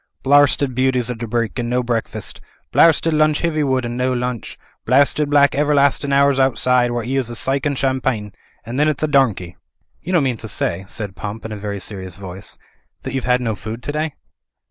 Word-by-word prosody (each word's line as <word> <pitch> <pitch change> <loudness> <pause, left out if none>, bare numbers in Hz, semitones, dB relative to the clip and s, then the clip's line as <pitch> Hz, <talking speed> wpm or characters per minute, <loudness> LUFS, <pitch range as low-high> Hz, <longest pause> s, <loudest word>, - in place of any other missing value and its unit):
"'Blarsted 140 -1 +4
beauties 130 -1 +1
o' - - -1
dibrike 115 0 -2
and 120 -1 -2
no 125 +1 +1
breakfast. 115 -4 -3 0.3
Blarsted 165 0 +4
lunch 155 0 +2
Hiv)rwood 145 -6 +1
and 120 0 -4
no 130 +1 +1
lunch.. 125 -1 -4 0.3
Blarsted 140 +3 +3
black 145 -1 +4
everlastin' 140 -1 +2
hours 140 0 +4
artside 125 -1 +2
while 120 -1 -2
'e 135 +2 -1
'as 130 -3 0
'is 120 - -5
cike 135 +2 0
an' 140 - -1
champine. 130 -6 -1 0.3
And 120 +5 -4
then 150 - +4
it's 155 -1 -1
a - - +3
domkey." 115 - +1 0.5
''You 180 - -4
don't 170 -5 +4
mean 125 -3 0
to 110 - -6
say," 95 -3 -2
said 100 -1 -5
Pump 105 +5 -6
in 110 - -5
a - - -4
very 100 -1 -5
serious 95 -1 -6
voice, 95 -1 -7 0.5
"that - - -5
you've 130 -2 -2
had 125 0 +3
no 115 -3 -1
food 110 +4 -7
to 145 - -3
day?" 155 0 -2
125 Hz, 200 wpm, -19 LUFS, 110-140 Hz, 0.5 s, Blarsted